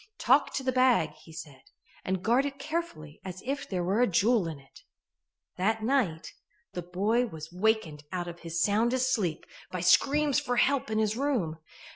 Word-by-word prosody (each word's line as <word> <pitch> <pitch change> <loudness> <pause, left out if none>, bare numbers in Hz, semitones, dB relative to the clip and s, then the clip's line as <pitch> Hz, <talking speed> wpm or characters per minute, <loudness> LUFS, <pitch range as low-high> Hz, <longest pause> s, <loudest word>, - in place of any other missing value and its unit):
"Talk - - +3
to 270 - -2
the 260 - +1
bag," 255 -11 +3
he 160 - -17
said, 145 -4 -10 0.4
"and 190 0 -2
guard 250 +5 +3
it 275 - -6
as 275 - -8
carefully 235 - -4
as 185 0 -8
if 275 +2 -3
there 180 -3 -1
were 195 +6 +1
a 245 - +5
jewel 205 +1 +2
in 160 -3 -5
it." 135 -2 -18 0.8
That 215 +4 0
night 220 - 0 0.4
the 180 - -3
boy 205 +8 0
was 160 -4 -9
wakened 180 -7 0
out 180 -2 -3
of 170 0 -8
his 165 0 -2
soundest 240 +5 +2
sleep 180 -8 -1 0.2
by 180 - -4
screams 275 - +4
for 245 - -2
help 265 -1 +2
in 215 - -1
his 215 -1 +1
room. 230 - -1
205 Hz, 185 wpm, -29 LUFS, 170-250 Hz, 0.8 s, a